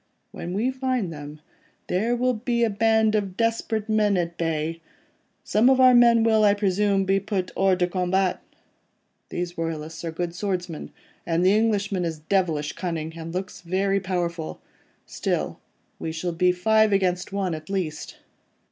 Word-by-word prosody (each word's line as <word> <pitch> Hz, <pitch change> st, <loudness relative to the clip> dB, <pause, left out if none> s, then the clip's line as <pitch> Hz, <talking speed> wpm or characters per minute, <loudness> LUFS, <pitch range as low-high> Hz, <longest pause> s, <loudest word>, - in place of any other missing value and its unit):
When 175 Hz, +2 st, -6 dB
we 235 Hz, +6 st, +1 dB
find 255 Hz, -9 st, -2 dB
them, 150 Hz, 0 st, -9 dB, 0.4 s
there 220 Hz, +7 st, 0 dB
will 250 Hz, +1 st, +1 dB
be 235 Hz, +1 st, 0 dB
a 225 Hz, -, +2 dB
band 220 Hz, +1 st, +3 dB
of 200 Hz, -3 st, -1 dB
desperate 230 Hz, -1 st, 0 dB
men 210 Hz, -2 st, +2 dB
at 170 Hz, -1 st, -2 dB
bay. 165 Hz, 0 st, -2 dB, 0.6 s
Some 220 Hz, +5 st, +3 dB
of 265 Hz, -1 st, +4 dB
our 255 Hz, -1 st, +7 dB
men 235 Hz, -1 st, +6 dB
will, 220 Hz, -1 st, +4 dB
I 205 Hz, -1 st, +5 dB
presume, 200 Hz, -1 st, +1 dB
be 195 Hz, +1 st, +2 dB
put 195 Hz, -2 st, -3 dB
hors 195 Hz, -1 st, +3 dB
de 180 Hz, -, +2 dB
combat. 185 Hz, +1 st, 0 dB, 0.9 s
These 175 Hz, -1 st, -4 dB
royalists 165 Hz, 0 st, -4 dB
are 165 Hz, -, -3 dB
good 170 Hz, +1 st, -3 dB
swordsmen, 180 Hz, -3 st, -4 dB, 0.3 s
and 170 Hz, +1 st, 0 dB
the 190 Hz, -, +5 dB
Englishman 205 Hz, -4 st, +1 dB
is 165 Hz, -2 st, -2 dB
devilish 155 Hz, -3 st, 0 dB
cunning, 165 Hz, -3 st, -4 dB
and 165 Hz, 0 st, -7 dB
looks 185 Hz, +1 st, -5 dB
very 195 Hz, +3 st, 0 dB
powerful. 175 Hz, -4 st, -3 dB, 0.5 s
Still, -, -, -2 dB, 0.4 s
we 160 Hz, -, -3 dB
shall 170 Hz, +2 st, -3 dB
be 180 Hz, +2 st, +3 dB
five 220 Hz, +4 st, +3 dB
against 185 Hz, -1 st, +1 dB
one 195 Hz, -3 st, -1 dB
at 155 Hz, +1 st, -7 dB
least. 175 Hz, -6 st, -3 dB
190 Hz, 160 wpm, -24 LUFS, 170-215 Hz, 0.9 s, our